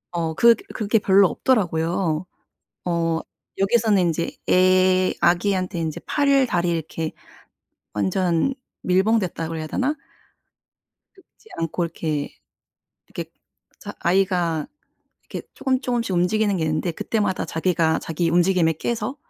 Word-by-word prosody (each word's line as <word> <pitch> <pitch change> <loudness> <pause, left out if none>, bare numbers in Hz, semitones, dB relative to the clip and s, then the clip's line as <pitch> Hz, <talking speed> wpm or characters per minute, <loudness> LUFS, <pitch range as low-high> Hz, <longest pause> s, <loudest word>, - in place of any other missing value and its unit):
어 165 -2 -1
그 235 +5 +7 0.2
그게 215 +1 +1
별로 195 -1 +5
없더라고요. 175 -7 0 0.6
어 165 -2 0 0.4
여기서는 210 0 +3
인제 170 -1 -1
애 185 0 +4
아기한테 185 +1 +1
인제 160 -2 -3
팔을 280 -2 +3
다리를 175 -5 0
이렇게 160 0 -4 0.8
완전 170 - +1 0.3
밀봉됐다 185 -2 +1
그래야 160 -1 -5
되나? 265 - -1 1.2
눕지 395 +3 -23
않고 165 +1 -2
이렇게 155 -3 -3 0.8
이렇게 - - -7 0.5
자 - - -8
아이가 175 -4 +1 0.6
이렇게 - - -7
쪼금 260 -1 -1
쪼금씩 240 -6 -1
움직이는 200 +3 +1
게 165 - -1
있는데 155 +3 -1
그때마다 205 +2 -1
자기가 160 -1 +1
자기 165 +1 -1
움직임에 175 -1 +3
깨서 235 - -3
180 Hz, 275 characters per minute, -22 LUFS, 165-205 Hz, 1.2 s, 그